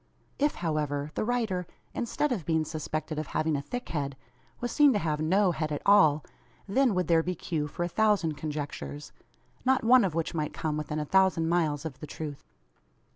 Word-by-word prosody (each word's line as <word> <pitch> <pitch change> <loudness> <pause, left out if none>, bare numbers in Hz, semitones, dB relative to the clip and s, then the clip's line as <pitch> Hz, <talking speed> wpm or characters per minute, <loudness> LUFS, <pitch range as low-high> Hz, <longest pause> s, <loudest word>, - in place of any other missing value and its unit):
If, 295 +1 +2
however, 150 -3 -2
the - - -1
rider, 215 -7 -1 0.3
instead 285 +5 -1
of 210 -9 -1
being 160 0 +1
suspected 155 0 -4
of 155 - -4
having 155 -1 +1
a 140 - -1
thick 245 +12 -6
head, 140 -4 -3 0.4
was 240 -1 -3
seen 290 -2 +5
to - - +2
have 155 -5 -1
no 185 +4 +3
head 155 -2 -2
at 145 - -3
all, 155 -8 +5 0.4
then 240 +1 +3
would 180 0 +1
there 165 -1 +4
be 180 +2 -2
cue 155 -2 -2
for 175 - -4
a - - 0
thousand 200 -4 +2
conjectures, 145 - -5 0.5
not 260 0 +3
one 250 +2 +6
of 180 -5 -1
which 165 0 -1
might 150 -2 -2
come 155 -1 -2
within 150 0 -3
a 150 - -1
thousand 185 -2 +3
miles 160 -3 +1
of 140 -5 -6
the 150 - -7
truth. 145 -1 -6
160 Hz, 195 wpm, -28 LUFS, 150-200 Hz, 0.5 s, one